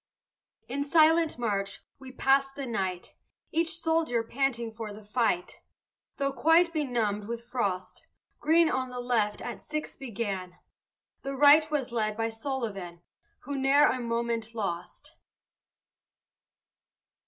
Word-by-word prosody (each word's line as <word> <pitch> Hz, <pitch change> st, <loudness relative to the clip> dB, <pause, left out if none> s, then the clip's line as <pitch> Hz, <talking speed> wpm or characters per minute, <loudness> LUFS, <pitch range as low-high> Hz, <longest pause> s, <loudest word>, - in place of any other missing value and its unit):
In 280 Hz, +3 st, -2 dB
silent 320 Hz, +2 st, +4 dB
march 200 Hz, -4 st, -2 dB, 0.2 s
we 265 Hz, -1 st, -10 dB
passed 270 Hz, +1 st, +2 dB
the 280 Hz, -, -4 dB
night, 190 Hz, -6 st, -3 dB, 0.4 s
Each 330 Hz, +1 st, 0 dB
soldier 320 Hz, -8 st, +1 dB
panting 235 Hz, -1 st, -1 dB
for 220 Hz, -1 st, -7 dB
the 210 Hz, +1 st, -11 dB
fight, 210 Hz, -4 st, -1 dB, 0.6 s
Though 275 Hz, 0 st, 0 dB
quite 330 Hz, +3 st, +4 dB
benumbed 235 Hz, -9 st, -1 dB
with 235 Hz, 0 st, -5 dB
frost. 205 Hz, -7 st, -3 dB, 0.3 s
Greene 325 Hz, +2 st, +4 dB
on 255 Hz, 0 st, -1 dB
the 250 Hz, 0 st, -6 dB
left 230 Hz, -4 st, 0 dB
at -, -, -6 dB
six 305 Hz, 0 st, -5 dB
began, 200 Hz, -8 st, -5 dB, 0.6 s
The 275 Hz, 0 st, -4 dB
right 295 Hz, +2 st, +7 dB
was 285 Hz, -5 st, -1 dB
led 215 Hz, -2 st, -1 dB
by 225 Hz, 0 st, 0 dB
Sullivan 225 Hz, -8 st, -5 dB, 0.4 s
Who 285 Hz, -, -5 dB
ne'er 275 Hz, +2 st, +5 dB
a 255 Hz, -, -1 dB
moment 230 Hz, -1 st, -2 dB
lost. 185 Hz, -6 st, -5 dB
245 Hz, 125 wpm, -28 LUFS, 215-280 Hz, 0.6 s, right